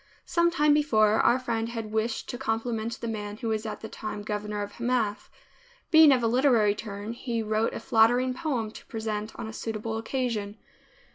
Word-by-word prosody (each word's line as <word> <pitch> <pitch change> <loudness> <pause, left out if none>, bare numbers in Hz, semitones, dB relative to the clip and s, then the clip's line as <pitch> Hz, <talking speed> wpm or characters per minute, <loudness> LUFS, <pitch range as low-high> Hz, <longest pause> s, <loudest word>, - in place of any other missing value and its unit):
Some 340 0 +2
time 300 -3 +3
before, 220 -8 +3
our 240 - +4
friend 230 -3 -2
had 225 -2 -5
wished 220 +1 -1
to 245 - -4
compliment 230 -2 -2
the 235 - -4
man 210 -2 -4
who 230 -1 -3
was 220 0 -1
at - - -6
the 220 - -6
time 215 -1 -6
governor 210 0 -3
of 205 - -7
Hamath. 235 -4 -1 0.6
Being 315 -3 +8
of 255 -3 +3
a - - +3
literary 235 -4 +4
turn 210 +1 -6
he 235 -1 -3
wrote 215 +1 0
a - - -3
flattering 245 +3 +3
poem 250 -7 -2
to - - -12
present 220 -1 -4
on 235 - -6
a 220 - -7
suitable 220 0 -4
occasion. 225 -4 -2
225 Hz, 190 wpm, -27 LUFS, 215-245 Hz, 0.6 s, Being